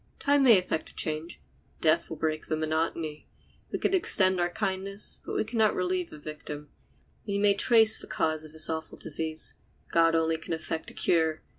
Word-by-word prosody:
Time 285 Hz, 0 st, +2 dB
may 240 Hz, -6 st, +7 dB
effect 180 Hz, -3 st, -2 dB
a -, -, -19 dB
change; 155 Hz, +2 st, -2 dB, 0.4 s
death 155 Hz, -1 st, +2 dB
will 160 Hz, -, -6 dB
break 155 Hz, 0 st, -2 dB
the 155 Hz, -, -1 dB
monotony. 155 Hz, 0 st, -2 dB, 0.4 s
We -, -, -1 dB
can -, -, 0 dB
extend 190 Hz, -, +3 dB
our 175 Hz, 0 st, +1 dB
kindness, 195 Hz, +1 st, -2 dB
but -, -, -2 dB
can 225 Hz, +1 st, -4 dB
not 215 Hz, -1 st, +3 dB
relieve 180 Hz, -1 st, -1 dB
the -, -, -11 dB
victim. 150 Hz, -1 st, -8 dB, 0.6 s
We 200 Hz, -1 st, -1 dB
may 200 Hz, 0 st, +4 dB
trace 220 Hz, +2 st, +5 dB
the -, -, -11 dB
cause 155 Hz, -1 st, -1 dB
of 155 Hz, -, -11 dB
this 155 Hz, 0 st, +2 dB
awful 160 Hz, 0 st, -4 dB
disease; 160 Hz, -1 st, -3 dB, 0.4 s
God 165 Hz, 0 st, +4 dB
only 165 Hz, 0 st, +1 dB
can 165 Hz, -, -6 dB
effect 160 Hz, 0 st, -4 dB
a -, -, -14 dB
cure. 160 Hz, -2 st, +1 dB
165 Hz, 185 wpm, -28 LUFS, 155-195 Hz, 0.6 s, may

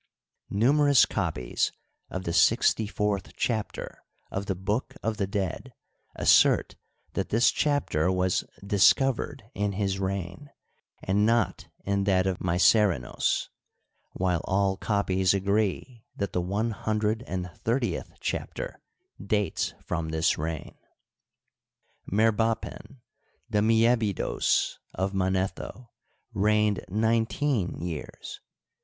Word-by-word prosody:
Numerous 140 Hz, +6 st, +4 dB
copies -, -, -1 dB, 0.4 s
of 95 Hz, -, -4 dB
the 85 Hz, -, -2 dB
sixty 110 Hz, +5 st, +3 dB
fourth 105 Hz, -1 st, -2 dB
chapter 110 Hz, -4 st, -3 dB, 0.3 s
of 100 Hz, +1 st, -3 dB
the 95 Hz, -, -1 dB
"Book 105 Hz, +7 st, -2 dB
of 110 Hz, -1 st, -1 dB
the 100 Hz, -, -1 dB
Dead 95 Hz, -4 st, -3 dB, 0.2 s
" -, -, -41 dB
assert -, -, +5 dB, 0.4 s
that -, -, -2 dB
this 115 Hz, +3 st, +4 dB
chapter 145 Hz, -, +1 dB
was 90 Hz, -1 st, +1 dB
" -, -, -14 dB
discovered 120 Hz, +5 st, +3 dB
" -, -, -50 dB
in 100 Hz, -1 st, 0 dB
his 95 Hz, -1 st, -1 dB
reign, 95 Hz, -, -4 dB, 0.5 s
and 100 Hz, +2 st, +2 dB
not 115 Hz, 0 st, +1 dB, 0.2 s
in 100 Hz, 0 st, 0 dB
that 95 Hz, -2 st, +3 dB
of 95 Hz, -2 st, -1 dB
Mycerinos, 90 Hz, -, +2 dB, 0.6 s
while 90 Hz, -3 st, 0 dB
all 95 Hz, 0 st, +1 dB
copies 95 Hz, -2 st, +1 dB
agree 105 Hz, +4 st, -1 dB
that 100 Hz, -1 st, -3 dB
the 90 Hz, -, +1 dB
one 105 Hz, +6 st, -1 dB
hundred 110 Hz, +2 st, -1 dB
and 90 Hz, -1 st, -4 dB
thirtieth 115 Hz, -6 st, -1 dB
chapter -, -, -4 dB, 0.4 s
dates 105 Hz, 0 st, -1 dB
from 85 Hz, -2 st, -2 dB
this 80 Hz, +1 st, +2 dB
reign. 80 Hz, -1 st, -5 dB, 1.3 s
Merbapen, 115 Hz, +4 st, 0 dB, 0.5 s
the 105 Hz, -, +2 dB
Aliebidos 115 Hz, -2 st, +2 dB, 0.2 s
of 95 Hz, +1 st, -1 dB
Manetho, 95 Hz, +5 st, -2 dB, 0.4 s
reigned 105 Hz, 0 st, +2 dB
nineteen 110 Hz, +1 st, 0 dB
years. 85 Hz, -4 st, -6 dB
100 Hz, 110 wpm, -27 LUFS, 95-110 Hz, 1.3 s, assert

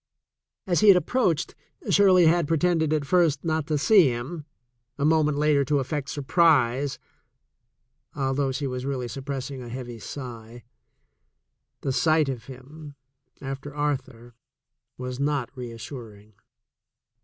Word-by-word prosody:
As 175 Hz, -2 st, +1 dB
he 215 Hz, -, +3 dB
had 195 Hz, -3 st, +9 dB
approached, 180 Hz, -, 0 dB, 0.4 s
Shirley 185 Hz, -3 st, +5 dB
had 165 Hz, -1 st, +3 dB
pretended 165 Hz, -1 st, +1 dB
at 155 Hz, -2 st, 0 dB
first 165 Hz, -3 st, +2 dB
not 160 Hz, -2 st, -1 dB
to 155 Hz, -, 0 dB
see 185 Hz, +2 st, +5 dB
him, 140 Hz, +6 st, -5 dB, 0.5 s
a 145 Hz, -, 0 dB
moment 155 Hz, -2 st, +2 dB
later 150 Hz, -1 st, +3 dB
to 145 Hz, +2 st, +1 dB
affect 140 Hz, +1 st, -3 dB
surprise, 140 Hz, -3 st, +2 dB, 1.2 s
although 135 Hz, 0 st, 0 dB
she 140 Hz, +2 st, -3 dB
was 125 Hz, -1 st, -4 dB
really 130 Hz, -2 st, -3 dB
suppressing 135 Hz, 0 st, -5 dB
a 120 Hz, -, -8 dB
heavy 120 Hz, -1 st, -7 dB
sigh. 120 Hz, -2 st, -9 dB, 1.2 s
The 135 Hz, -, -1 dB
sight 155 Hz, +1 st, +2 dB
of 120 Hz, -4 st, -5 dB
him, 140 Hz, +3 st, -12 dB, 0.5 s
after 135 Hz, +1 st, -6 dB
Arthur, 130 Hz, -5 st, -3 dB, 0.6 s
was 125 Hz, 0 st, -6 dB
not 140 Hz, -3 st, -1 dB
reassuring. 115 Hz, -3 st, -9 dB
140 Hz, 125 wpm, -25 LUFS, 125-155 Hz, 1.2 s, had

